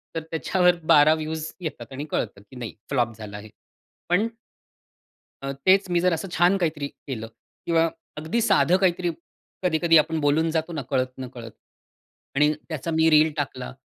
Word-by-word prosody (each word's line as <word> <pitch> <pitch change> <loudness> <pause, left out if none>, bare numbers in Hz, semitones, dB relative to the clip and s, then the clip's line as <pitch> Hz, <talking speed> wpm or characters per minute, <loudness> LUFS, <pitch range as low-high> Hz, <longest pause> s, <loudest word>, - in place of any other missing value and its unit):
तर 165 - -1
त्याच्यावर 180 +2 +2 0.2
12 150 +1 +7
व्यूज 155 0 -4
येतात 160 -5 -6
आणि 140 +3 -5
कळतं, 100 -2 -2
की 105 +5 -17
नाही 120 -3 -6 0.2
फ्लॉप 120 -4 0
झालं 105 -2 -8
आहे, 105 +1 -11 0.6
पण 190 +6 +3 1.2
अ, 135 - -2
तेच 190 0 +5
मी 175 -1 +2
जर 180 0 +3
असं 165 +4 -3
छान 180 +3 +3
काहीतरी 155 -5 -1
केलं 120 -6 -7 0.4
किंवा 165 -1 +3 0.3
अगदी 160 +10 -1
साधं 185 -3 +4
काहीतरी 180 -2 +1 0.5
कधी-कधी 165 -1 +4
आपण 160 +1 +2
बोलून 155 +2 +2
जातो 160 -1 -2
कळत-नकळत 130 -2 -3 0.8
आणि 150 +2 +4 0.2
त्याचा 160 +1 -4
मी 160 0 +4
रील 155 0 +5
टाकला 130 -3 -4
155 Hz, 150 wpm, -24 LUFS, 135-175 Hz, 1.2 s, 12